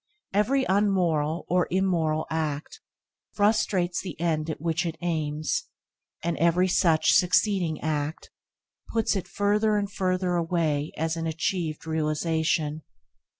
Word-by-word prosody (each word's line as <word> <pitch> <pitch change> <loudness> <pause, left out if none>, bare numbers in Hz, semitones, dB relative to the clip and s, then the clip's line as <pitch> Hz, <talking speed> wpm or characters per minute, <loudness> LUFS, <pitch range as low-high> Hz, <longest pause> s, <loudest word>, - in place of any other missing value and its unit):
Every 255 +7 +2
unmoral 175 -6 +1
or 180 0 +2
immoral 170 -4 +1
act 155 -2 -3 0.5
frustrates 205 -4 +1
the 180 -6 -7
end 165 -2 0
at 155 - -4
which 165 +2 0
it 165 -2 -4
aims, 155 -3 -1 0.6
and 170 0 0
every 170 +2 +3
such 165 -3 +3
succeeding 180 -3 +2
act 150 0 -3 0.6
puts 225 -2 +1
it 195 - -3
further 210 +1 +1
and 200 -1 -2
further 185 -2 0
away 165 -3 0
as 160 +1 -1
an 165 0 -2
achieved 160 -1 -2
realisation. 160 0 0
170 Hz, 120 wpm, -26 LUFS, 155-185 Hz, 0.6 s, every